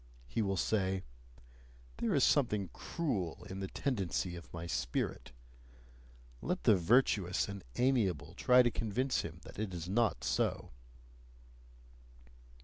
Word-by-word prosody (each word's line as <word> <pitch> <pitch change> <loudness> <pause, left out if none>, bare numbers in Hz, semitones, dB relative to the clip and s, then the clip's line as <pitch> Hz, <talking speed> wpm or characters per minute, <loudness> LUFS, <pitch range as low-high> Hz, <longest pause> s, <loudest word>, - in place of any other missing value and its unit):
He 65 - -2
will 100 -2 0
say: 95 -2 0 0.9
"There - - 0
is - - +4
something 105 - +2
cruel 105 - -3
in 95 - -5
the 95 - -3
tendency 95 - -2
of 85 - -11
my 85 0 -6
spirit": 65 -7 -2 1.1
let - - -2
the 105 - +6
virtuous 95 -1 +3
and 100 -1 -7
amiable 100 - +1
try 125 +6 +5
to 120 - +2
convince 125 +5 0
him 80 +1 -8
that - - -11
it 105 -4 -3
is 85 0 -5
not 105 - +1
so! - - 0
95 Hz, 130 wpm, -34 LUFS, 85-115 Hz, 1.1 s, the